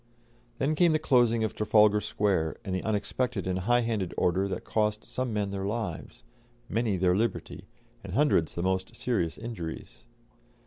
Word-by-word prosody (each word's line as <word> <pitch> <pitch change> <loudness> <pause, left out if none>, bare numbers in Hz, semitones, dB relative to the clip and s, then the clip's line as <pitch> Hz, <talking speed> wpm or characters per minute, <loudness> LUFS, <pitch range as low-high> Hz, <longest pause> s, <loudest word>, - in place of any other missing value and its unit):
Then 140 +5 +1
came 165 +1 +4
the - - +4
closing 120 -6 +3
of 110 - -1
Trafalgar 105 0 +4
Square, 95 -8 0
and 95 - -3
the 95 - -1
unexpected 110 +1 -1
and 95 0 -1
high 120 +6 +2
handed 110 -6 -2
order 95 +3 +2
that 95 - -4
cost 105 0 -1
some 130 -1 -3
men 105 -2 -1
their 100 -1 -3
lives, 110 +1 -4 0.4
many 110 -3 0
their 90 0 +3
liberty, 110 0 -2 0.4
and - - -7
hundreds 140 - +2
the 85 - -2
most 95 0 -1
serious 95 -10 -1
injuries. 105 -9 -7
105 Hz, 165 wpm, -28 LUFS, 95-120 Hz, 0.4 s, came